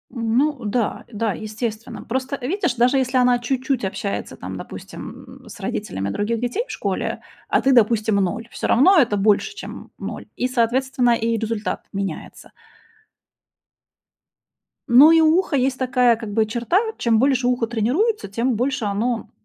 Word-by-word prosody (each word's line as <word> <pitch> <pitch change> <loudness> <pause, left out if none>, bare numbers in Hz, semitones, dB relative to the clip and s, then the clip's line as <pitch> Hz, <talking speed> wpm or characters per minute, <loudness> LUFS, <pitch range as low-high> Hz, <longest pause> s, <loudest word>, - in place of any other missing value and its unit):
М, 230 0 0
ну 285 -4 +1
да, 215 +2 -1
да, 215 -1 -1
естественно. 215 +1 -5
Просто 260 +3 -3
видишь, 280 - -1
даже 250 +3 +3
если 260 0 +1
она 250 -1 +4
чуть-чуть 260 -2 -1
общается 100 - -4
там, - - -7
допустим, - - -10
м, - - -14
с - - -11
родителями 95 +1 -3
других 220 - -1
детей 245 - -2
в - - -8
школе, - - -3 0.3
а - - +2
ты, 270 - +3
допустим, 220 -3 +3
0, 200 +4 -1
всё - - -3
равно 360 +10 +5
это 230 -6 +2
больше 210 - +2
чем, - - -7
м, - - -11
0. - - -6
И, 250 - 0
соответственно, 250 0 +1
и 230 0 0
результат 220 -1 -3
меняется. 195 -5 -6 2.4
Ну, 275 +7 +8
и 325 0 +6
у 320 +2 +5
уха 360 -6 -1
есть 260 0 +1
такая 250 -2 +3
как 220 -3 -7
бы 220 0 +2
черта- 235 - +1 0.2
чем 225 -2 +2
больше 260 -2 +2
ухо 245 -2 +1
тренируется, 250 - 0
тем 230 +5 -1
больше 255 0 -1
оно 225 +4 -2
240 Hz, 165 wpm, -21 LUFS, 220-265 Hz, 2.4 s, Ну